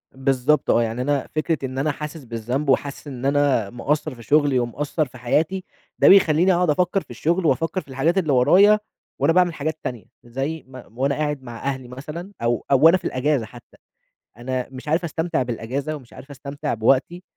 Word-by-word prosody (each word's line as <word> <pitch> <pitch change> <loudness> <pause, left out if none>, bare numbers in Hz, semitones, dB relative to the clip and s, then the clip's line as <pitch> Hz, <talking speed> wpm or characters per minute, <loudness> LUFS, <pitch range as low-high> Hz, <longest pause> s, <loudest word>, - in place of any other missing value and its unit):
بالضبط 135 +2 +1
آه، 120 - +4
يعني 115 +2 -3
أنا 140 +1 0
فكرة 155 +1 0
إن 130 0 -6
أنا 145 +3 +1
حاسس 150 +1 -7
بالذنب، 120 +4 -3
وحاسس 140 +2 0
إن 130 -2 -6
أنا 140 -7 +2
مقصَّر 145 +5 -2
في 120 - -13
شغلي 145 +1 +3
ومقصَّر 145 +6 -1
في 130 - -14
حياتي، 160 +10 0 0.4
ده - - +5
بيخلّيني 185 -1 +6
أقعد 175 -1 +2
أفكّر 180 +5 +1
في - - -20
الشغل 170 +3 -1
وأفكّر 165 +4 +1
في - - -24
الحاجات 140 +7 0
اللي 160 -7 +2
ورايا، 190 +12 +6 0.4
وأنا 165 - +3
باعمل 180 -1 +3
حاجات 155 +1 -3
تانية، 120 -4 -5 0.2
زي 135 +7 -4
م 130 -3 -13
وأنا 140 +1 +1
قاعد 150 -3 -2
مع 120 -2 -9
أهلي 130 -2 -3
مثلًا 150 +9 -8
أو 120 0 0
أو 135 - +5
وأنا 165 +3 +8
في - - -14
الأجازة 130 -2 0
حتى، 120 +2 -16 0.6
أنا 125 +1 -3
مش 130 +2 -10
عارف 160 +4 +1
أستمتع 160 -3 -1
بالأجازة، 125 +5 -3
ومش 130 -5 -13
عارف 140 - -12
أستمتع 140 +1 -5
بوقتي، 130 +10 +1
140 Hz, 190 wpm, -22 LUFS, 125-160 Hz, 0.6 s, وأنا